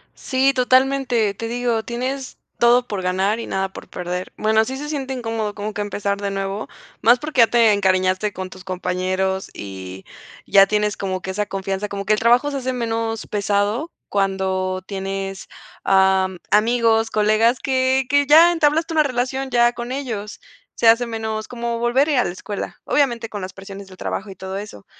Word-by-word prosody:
Sí, 270 +1 +1
totalmente, 255 -4 +2
te 230 +3 -5
digo, 235 -1 -1
tienes 255 +3 -4 0.2
todo 240 +1 +4
por 205 -3 -3
ganar 190 +4 0
y 230 - -6
nada 190 0 -2
por - - -10
perder. 180 +1 -5
Bueno, 220 +1 +3
sí 260 +4 -5
se 295 +2 -6
siente 280 -3 -4
incómodo 225 -4 -3
como 210 +1 -4
que 205 - -3
empezar 200 -1 -2
de 200 - -1
nuevo, 195 +1 -3 0.3
más 240 +2 +6
porque 300 -2 +1
ya 230 - +7
te 230 -2 +4
encariñaste 185 0 +1
con 185 -1 -6
tus 185 - -12
compañeros, 185 +1 -2
y 95 -1 -8 0.4
ya 195 0 +6
tienes 210 0 0
como 185 -1 -3
que 190 - -3
esa 205 +2 -2
confianza, 195 +1 -3
como 200 0 -5
que 215 - +3
el 210 - +1
trabajo 245 +5 +3
se 280 - -3
hace 260 -1 -2
menos 225 -2 -2
pesado 205 - -1 0.2
cuando 190 -1 -1
tienes, 195 0 -5 0.4
am, 190 -1 +3
amigos, 225 0 +3
colegas 215 +3 +2
que 260 0 +1
que 285 +1 +2
ya 325 +4 +8
entablaste 320 0 +1
una 315 - +4
relación 265 0 -2
ya 240 -1 +3
con 240 +1 -6
ellos, 230 -7 -5 0.4
se 230 - +2
hace 230 +2 +5
menos 220 -1 -4
como 235 -1 -3
volver 240 +5 +2
a - - +2
ir - - +2
a 245 - +4
la - - -2
escuela. 200 +3 -6
Obviamente 240 -6 +1
con 205 -2 -6
las 185 - -6
presiones 195 0 -10
del 185 - -14
trabajo 200 +2 -4
y - - -10
todo 190 +1 -6
eso, 200 - -9
215 Hz, 185 wpm, -21 LUFS, 195-245 Hz, 0.4 s, ya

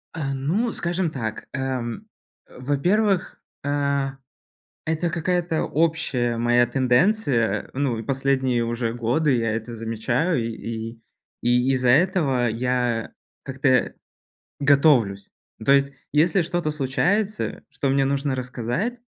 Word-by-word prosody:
Э, 140 -4 -2
ну, 175 - -1
скажем 175 0 -1
так, 110 -6 -5
эм, 130 - -3 0.4
э, - - -16
во-первых, 180 +9 +1 0.2
э, 140 -1 0 0.8
это 160 +2 0
какая-то 170 0 0
общая 140 -7 0
моя 120 +1 +3
тенденция. 125 - +1
Ну, 125 -5 -1
последние 130 -3 +1
уже 115 0 -2
годы 125 +5 +1
я 115 -2 0
это 115 +1 -4
замечаю, 115 +9 -1
и - - -2
и 115 0 -6 0.4
и 125 +2 +2
из-за 125 -1 +2
этого 140 -4 +3
я 120 -1 -1 0.3
как-то 130 -2 +1 0.7
готовлюсь. 140 -9 +3 0.4
То 135 - +5
есть, 140 0 +3 0.2
если 165 +5 +3
что-то 170 -1 -1
случается, 180 +10 -1
что 140 -1 -2
мне 135 0 +3
нужно 140 0 0
рассказать, 125 - -2
135 Hz, 115 wpm, -23 LUFS, 120-160 Hz, 0.8 s, То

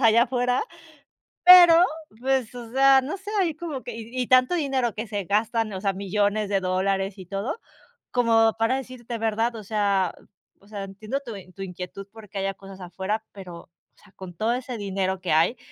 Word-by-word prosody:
allá 230 -1 +5
afuera, 250 +1 0 0.8
pero, 350 -1 +9 0.4
pues, 260 -2 0
o 240 -2 -9
sea, 270 0 +6
no 285 +9 -4
sé, 390 +2 -9
ahí 340 -4 0
como 310 -4 -6
que 245 - -7
y 230 0 -9
y - - -3
tanto 255 +5 +4
dinero 270 - 0
que 215 +3 -5
se 205 -2 -3
gastan, 215 +2 0
o 190 - -5
sea, 195 0 0
millones 205 +2 -1
de 195 -1 +1
dólares 190 +1 -1
y 185 - -10
todo, 200 - -4 0.5
como 225 -2 +3
para 225 +3 +1
decirte, 250 -2 -7
¿verdad? 225 +1 0
O 220 - -8
sea 200 -3 0 0.5
o - - -20
sea, 205 -1 -6
entiendo 215 +7 -5
tu 230 -3 -6
en 185 -2 -12
tu 195 - -7
inquietud, 180 +1 -7
porque 210 -2 -11
haya 195 0 -1
cosas 195 0 -13
afuera, 190 +5 -3
pero, 180 -4 -10
o - - -24 0.3
sea, 210 - -22
con 185 -2 -9
todo 220 +6 0
ese 250 -1 -4
dinero 190 -2 -2
que 185 - -3
hay, 165 +10 +3
215 Hz, 195 wpm, -24 LUFS, 195-250 Hz, 0.8 s, pero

